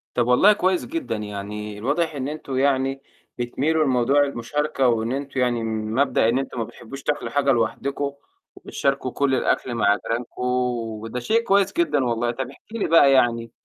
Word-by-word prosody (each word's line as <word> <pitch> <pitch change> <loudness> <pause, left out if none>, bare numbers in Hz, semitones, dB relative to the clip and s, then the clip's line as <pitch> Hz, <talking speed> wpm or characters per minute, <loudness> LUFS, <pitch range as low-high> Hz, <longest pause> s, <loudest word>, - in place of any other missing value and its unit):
طَب 120 -1 +1
والله 190 +12 +6
كويس 185 -2 0
جدًا، 325 - -3
يعني 105 0 -6
الواضح 150 +6 0
إن 135 0 -3
أنتم 145 -3 -5
يعني 135 0 +1 0.4
بتميلوا 150 +6 0
لموضوع 135 +2 +3
المشاركة، 140 +1 -1
وإن 115 0 +1
أنتم 140 0 -3
يعني 120 -2 +1
مبدأ 110 +2 +1
إن 125 +3 +2
أنتم 135 -2 -5
ما - - 0
بتحبّوش 135 +5 -10
تأكلوا 150 - -2
حاجة 140 -1 +2
لوحدكم 140 +3 -1 0.4
وبتشاركوا 135 -2 -2
كل 140 -2 +1
الأكل 125 -1 0
مع 100 -2 +3
جيرانكم، 115 +3 -5 0.6
وده 115 +2 -5
شيء 225 - +1
كويس 195 -2 +2
جدًا 340 - +1
والله. 120 0 0
طَب 130 +1 -5
احكي 220 +11 -11
لي - - 0
بقى 150 -4 +6
يعني 115 -3 +2
130 Hz, 165 wpm, -23 LUFS, 115-145 Hz, 0.6 s, والله